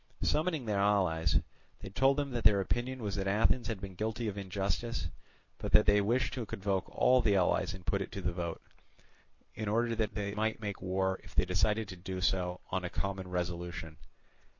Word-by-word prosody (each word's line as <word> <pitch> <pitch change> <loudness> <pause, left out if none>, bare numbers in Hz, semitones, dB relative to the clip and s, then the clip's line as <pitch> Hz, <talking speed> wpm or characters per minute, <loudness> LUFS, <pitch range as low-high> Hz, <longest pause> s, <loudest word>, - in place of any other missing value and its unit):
Summoning 155 -3 +1
the 105 - -1
allies, 85 -7 +3 0.4
they 100 - -7
told 135 +7 +3
them 140 -2 -1
that 120 -2 -2
their 100 -2 +6
opinion 120 +5 -2
was 100 -2 -2
that 95 -1 -2
Athens 110 +4 +2
had 110 -3 -3
been 95 0 -7
guilty 110 +4 -2
of 100 - -2
injustice, 100 +4 -2 0.5
but - - -4
that 105 - +7
they 105 0 +5
wished 115 +3 +1
to 125 -3 -3
convoke 95 -1 -1
all 130 0 +4
the 105 -4 +3
allies 95 0 +2
and 90 -2 -12
put 100 - +1
it 95 - -4
to 100 - -4
the 90 -1 -1
vote; 85 -1 -4 0.9
in 110 - -4
order 115 +2 +1
that 110 -2 -1
they 100 -1 -2
might 110 +1 0
make 105 -3 -4
war, 95 0 0
if - - -15
they - - +4
decided 105 +4 +1
to 95 - -7
do 95 +1 -5
so, 90 -1 0
on 95 0 0
a 90 - -2
common 95 -1 -3
resolution. 85 -2 -4
100 Hz, 200 wpm, -32 LUFS, 95-110 Hz, 0.9 s, that